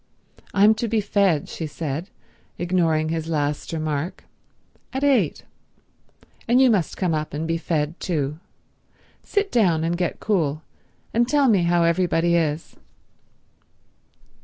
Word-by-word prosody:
"I'm 205 +2 +5
to 235 - 0
be 225 0 +1
fed," 200 -7 +1
she 160 - -5
said, 155 +4 -4 0.5
ignoring 165 -3 +1
his 165 0 -3
last 150 -2 -2
remark, 155 +1 -3 0.7
"at 265 +1 -3
eight, 280 -3 +2 1.0
and 240 +2 +4
you 260 -2 +6
must 185 -7 0
come 180 -4 0
up 155 -1 -3
and 160 +2 -3
be 165 0 -1
fed 160 0 -2
too. 150 -3 -2 0.8
Sit 405 -1 -1
down 175 -9 +2
and 170 +1 0
get 175 -1 -2
cool 160 -7 0 0.5
and 235 +1 +2
tell 285 +1 +3
me 195 -7 +3
how 170 0 +3
everybody 170 0 +2
is." 160 -1 -1
170 Hz, 135 wpm, -23 LUFS, 155-205 Hz, 1.0 s, you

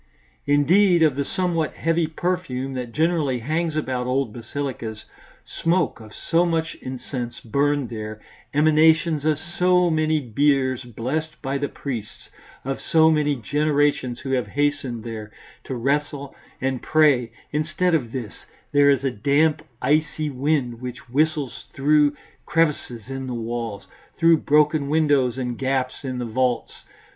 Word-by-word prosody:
Instead 170 +5 +4
of 150 -4 +3
the 140 - 0
somewhat 170 0 -1
heavy 165 0 +1
perfume 155 -6 -2
that 125 -2 -5
generally 155 -3 +1
hangs 155 +6 -1
about 130 -5 -2
old 130 -3 0
basilicas, 120 -2 -5 0.4
smoke 170 -4 0
of 110 -1 -12
so 165 +9 +1
much 165 -2 0
incense 125 -2 -5
burned 140 +2 0
there, 110 -1 -6 0.3
emanations 155 +1 +4
of 155 -1 +2
so 180 +1 +2
many 155 0 +2
biers 130 0 +1
blessed 145 +7 -4
by 135 0 -2
the 145 - -2
priests, 115 -7 -7 0.4
of 135 0 -3
so 160 0 +4
many 150 -2 +2
generations 145 0 0
who 135 - -4
have 125 -5 0
hastened 140 -2 -1
there 110 -2 -7 0.3
to 130 - -4
wrestle 140 +2 -1 0.2
and 130 -1 -1
pray 145 -7 +3 0.2
instead 155 +4 0
of 125 -8 0
this, 120 -5 -5 0.4
there 145 -1 +5
is 140 -1 +3
a 135 - +1
damp, 145 +7 +2 0.2
icy 155 0 +1
wind 130 -3 -1
which 125 -1 -7
whistles 150 0 0
through 145 +1 +3 0.3
crevices 150 -8 0
in 135 0 -5
the 125 - -3
walls, 115 -3 -4 0.3
through 165 -1 +5
broken 150 -1 +2
windows 145 -5 +2
and 125 -2 -3
gaps 130 -1 -1
in 130 -2 -3
the 125 - -3
vaults. 125 +1 0
140 Hz, 140 wpm, -23 LUFS, 125-155 Hz, 0.4 s, there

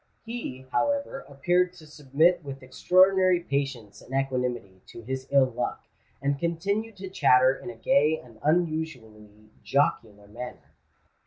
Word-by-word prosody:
He, 225 - -6
however, 285 -1 0
appeared 175 +6 +1
to 170 -4 -15
submit 155 +4 +1
with 135 -2 -8
extraordinary 185 +6 +4
patience 135 -9 -4
and 130 - -8
equanimity 125 -8 -2
to 115 - -11
his 130 +2 -5
ill 140 -1 +5
luck, - - -3 0.4
and 140 0 0
continued 200 +7 -2
to 190 0 -7
chatter 130 -7 +4
in 180 - -9
a - - -8
gay 160 - +2
and 115 -6 -16
unusually 125 -11 -2
jocular 105 -4 0
manner. 120 +4 -9
140 Hz, 135 wpm, -26 LUFS, 125-180 Hz, 0.4 s, ill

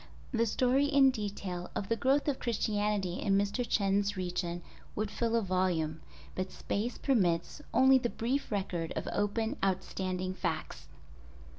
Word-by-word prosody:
The 230 -2 +2
story 255 +5 +3
in 280 -2 +5
detail 200 -6 -4
of 195 - -2
the 230 - +1
growth 270 +5 +2
of 280 -3 0
Christianity 210 -5 0
in 195 -1 +2
Mr. 205 +5 0
Chen's 200 0 +1
region 175 -1 -3 0.3
would 215 0 -2
fill 230 +1 0
a 230 - +2
volume, 175 -4 0 0.3
but 185 0 -3
space 220 +5 -3
permits 190 - +1
only 265 0 +6
the 240 - -1
brief 250 +5 -2
record 180 -5 -2
of - - -3
open 220 +5 0
outstanding 185 -1 -1
facts. 70 - -4
205 Hz, 145 wpm, -31 LUFS, 185-235 Hz, 0.3 s, only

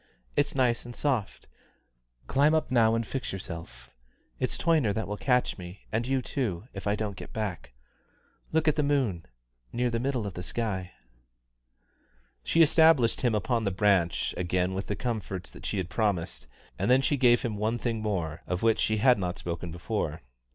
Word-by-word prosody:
It's - - +1
nice 125 -3 +2
and 120 0 -9
soft 130 -9 -1 0.8
climb 145 +3 +3
up 155 - 0
now 115 -2 +4
and 115 0 -1
fix 130 +2 -4
yourself. 85 -3 -8 0.5
It's - - -1
Toyner 155 -11 +2
that 110 - -2
will 105 - -3
catch 125 -1 +1
me, 90 +2 -9
and 115 +2 -1
you 135 -1 +1
too, 110 - -3
if 95 +1 -6
I 100 - +2
don't 105 -2 -3
get - - -9
back. 105 - -4 0.8
Look 160 0 +1
at 155 - +3
the - - +3
moon 135 - 0 0.4
near 120 0 0
the 115 - 0
middle 125 -3 -1
of 100 - -4
the 90 - -6
sky." 95 -2 -3 1.5
She 165 - +5
established 160 -6 +5
him 120 -4 +2
upon 115 +3 0
the 100 - +1
branch 95 -3 +2
again 90 +1 0
with 95 +1 -4
the 105 - -1
comforts 105 -7 -4
that - - -8
she 105 - -2
had 95 -3 -1
promised, 100 -7 -1 0.3
and 100 - 0
then 130 +2 +5
she 145 - +2
gave 125 -3 +4
him 115 -3 -2
one 110 +3 0
thing 115 -2 -2
more, 85 -7 -2
of 90 +3 -2
which 115 -1 +3
she 110 - +1
had 125 +1 +5
not 90 -2 -2
spoken 85 0 -4
before. 85 - -3
110 Hz, 185 wpm, -28 LUFS, 95-125 Hz, 1.5 s, She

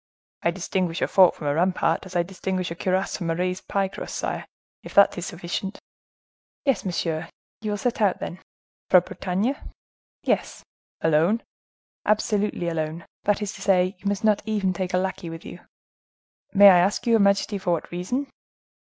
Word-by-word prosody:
"I - - +2
distinguish 175 -1 -2
a - - +2
fort 185 -2 +5
from 150 - -8
a 145 - +2
rampart 175 +2 +1
as 185 - -12
I 175 - +3
distinguish 185 -1 -3
a - - -4
cuirass 185 +2 0
from 170 -3 -3
a 165 - +1
raised 180 +1 -2
pie 195 -1 +1
crust, 190 - -7
sire. - - -3 0.3
Is - - -11
that 200 - +7
sufficient?" 180 +3 -4 0.9
"Yes, 270 -8 +2
monsieur. 165 -3 -2 0.3
You 215 - -3
will 205 - -1
set 240 +1 -1
out, 200 -3 +3
then." 175 - -6 0.5
"For 185 - +8
Bretagne?" 190 +7 -2 0.7
"Yes." - - -1 0.4
"Alone?" 165 +8 +3 0.6
"Absolutely 210 -3 +1
alone. 160 0 -3 0.2
That 205 +1 +2
is 205 - -4
to 200 - -11
say, 185 -1 +2
you 200 - -5
must 200 0 -1
not 215 -2 +3
even 205 -3 0
take 180 0 -2
a - - +3
lackey 185 -2 -2
with 165 0 -9
you." - - -9 0.9
"May 200 0 +9
I 180 - +6
ask 190 +4 +1
your 230 -2 +4
majesty 200 0 +2
for 180 -2 0
what 165 - -3
reason?" 185 +11 -2
185 Hz, 175 wpm, -24 LUFS, 175-200 Hz, 0.9 s, May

